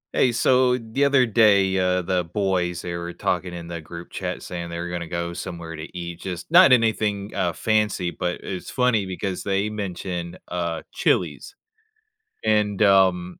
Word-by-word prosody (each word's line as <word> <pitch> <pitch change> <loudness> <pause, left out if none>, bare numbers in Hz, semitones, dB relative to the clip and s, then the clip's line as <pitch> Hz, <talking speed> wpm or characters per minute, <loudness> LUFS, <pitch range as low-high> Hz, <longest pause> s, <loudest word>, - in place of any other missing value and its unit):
Hey, 125 - +4
so 125 +1 +3
the 115 +4 -1
other 140 -2 +4
day, 100 -4 +4
uh, 90 0 +1
the 90 0 0
boys, 90 -1 -1
they 85 - -4
were 85 0 -5
talking 90 +1 -1
in 85 -1 -7
the 85 -1 -6
group 85 +2 -10
chat - - -4
saying 85 -1 -6
they 85 - -5
were 85 +1 -4
gonna 85 -1 -4
go 85 0 -3
somewhere 85 -2 -6
to 80 +3 -8
eat, 85 -1 -6
just 90 - -6
not 175 -3 +8
anything, 110 -4 +2
uh, 85 - 0
fancy, 105 -5 0
but 90 0 -3
it's 95 -2 -6
funny 125 -6 +1
because 95 0 -4
they 100 +2 -1
mention, 90 -4 -5
uh, 85 -2 -3
Chili's. 405 - 0 0.9
And, 105 -2 +1
um, 95 -3 +3
95 Hz, 170 wpm, -23 LUFS, 85-105 Hz, 0.9 s, not